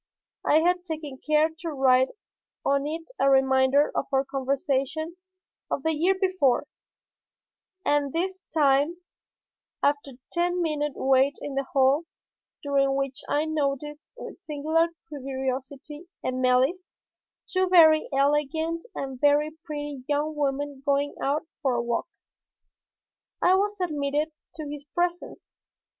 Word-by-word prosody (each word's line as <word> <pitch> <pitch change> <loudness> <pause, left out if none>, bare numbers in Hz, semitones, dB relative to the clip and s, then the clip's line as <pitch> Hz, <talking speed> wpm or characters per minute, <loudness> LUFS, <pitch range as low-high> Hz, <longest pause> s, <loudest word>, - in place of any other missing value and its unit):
I 310 - +4
had 355 +1 +2
taken 305 -6 -6
care 305 +1 +3
to 340 - -4
write 260 -3 +4 0.6
on 280 +1 +2
it 325 +6 -6
a 275 - +4
reminder 265 +1 +4
of - - -1
our 270 0 +2
conversation 275 +4 -1 0.5
of 275 - -2
the 320 - +2
year 350 +6 +2
before, 370 -10 +2 1.2
and 290 -1 +2
this 375 +4 -3
time, 290 +2 +2 0.9
after 285 -1 +1
a 245 - -19
ten 350 +1 0
minute 300 -4 -1
wait 270 +1 +3
in 290 - -6
the 275 0 -1
hall, 275 +4 +2 0.6
during 275 -1 +2
which 275 -1 -2
I 295 +2 +1
noticed 295 -1 -2
with 450 - -9
singular 315 +2 +1 0.2
curiosity 270 +2 -5 0.2
and 255 0 -2
malice 260 +9 +2 0.5
two 370 -1 0
very 315 -4 +6
elegant 295 +4 +1
and 265 -2 -5
very 295 +1 +4
pretty 290 -3 -5
young 295 +1 0
women 285 -1 -2
going 285 0 +1
out 290 +3 0 0.2
for 265 -4 +1
a 240 - +1
walk, 235 +6 -1 1.3
I 360 - +4
was 410 +2 +1
admitted 300 -2 -1 0.2
to 310 -2 -6
his 290 0 -7
presence. 350 +4 -3
290 Hz, 130 wpm, -26 LUFS, 275-320 Hz, 1.3 s, very